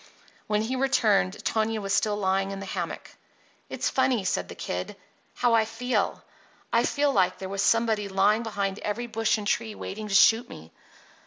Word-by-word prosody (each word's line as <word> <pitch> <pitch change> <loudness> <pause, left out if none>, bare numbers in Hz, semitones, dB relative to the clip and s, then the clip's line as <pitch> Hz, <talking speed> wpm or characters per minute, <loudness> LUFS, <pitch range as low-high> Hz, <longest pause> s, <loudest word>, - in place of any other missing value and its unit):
When 210 0 +1
he 250 +4 -2
returned 215 -8 +1
Tonia 220 0 0
was 195 -1 -2
still 210 0 +1
lying 195 -1 0
in 195 0 -5
the 195 - -6
hammock. - - -5 0.6
"It's - - -2
funny," 260 -5 +1
said - - -1
the - - -8
Kid, - - -4 0.4
"how 245 -1 +2
I 225 -1 +5
feel. 240 +3 -2 0.5
I - - +4
feel 285 -1 +1
like 185 -3 +2
there 190 - -6
was 195 0 -2
somebody 220 -2 +2
lying 200 +3 +3
behind 200 -3 -3
every 220 +4 -3
bush 225 -1 0
and 210 - -6
tree 220 0 -1
waiting 215 +2 -6
to 195 - -1
shoot 225 +4 +5
me. 80 +1 -11
215 Hz, 180 wpm, -26 LUFS, 195-230 Hz, 0.6 s, I